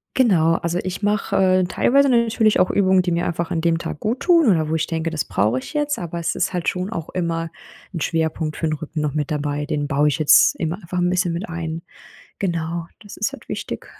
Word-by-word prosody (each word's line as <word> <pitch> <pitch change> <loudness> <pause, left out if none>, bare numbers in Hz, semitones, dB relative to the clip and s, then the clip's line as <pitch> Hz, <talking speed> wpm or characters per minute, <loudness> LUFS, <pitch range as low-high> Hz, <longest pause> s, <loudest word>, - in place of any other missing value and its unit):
Genau, 175 -11 +4
also 170 +1 -2
ich 185 +1 -4
mache, 205 -1 0
äh, 185 -1 +4
teilweise 275 +9 +3
natürlich 230 -3 +3
auch 185 - +3
Übungen, 190 -2 +3
die 180 - -2
mir 170 +1 0
einfach 170 -1 -2
an 165 - -1
dem 165 0 +1
Tag 155 - -5
gut 230 +4 -2
tun, 335 -5 +4
oder 160 -7 +2
wo 160 - 0
ich 160 -1 0
denke, 165 0 -2
das 160 -2 -2
brauche 110 +5 +1
ich 130 - -7
jetzt, 295 -1 0
aber 170 -1 -5
es 170 - -2
ist - - -1
halt 175 -2 0
schon 185 +2 -4
auch 165 -8 -5
immer 165 -2 -2 0.5
'n 165 - -2
Schwerpunkt 160 -1 -1
für 160 - -1
'n 155 - -1
Rücken 155 +1 -5
noch 150 -1 -2
mit 150 -1 -2
dabei. 145 0 -2
Den 145 -2 -2
baue 145 +1 +2
ich 145 - -2
jetzt 155 - +6
immer 165 0 -1
einfach 180 -2 -4
'n 175 - +2
bisschen 180 -1 0
mit 170 +2 -4
ein. 165 0 -4 0.6
Genau, 170 -2 -2
das 205 -2 -11
ist 215 - -1
halt - - -12
wichtig. - - -5
170 Hz, 235 wpm, -21 LUFS, 160-190 Hz, 0.6 s, jetzt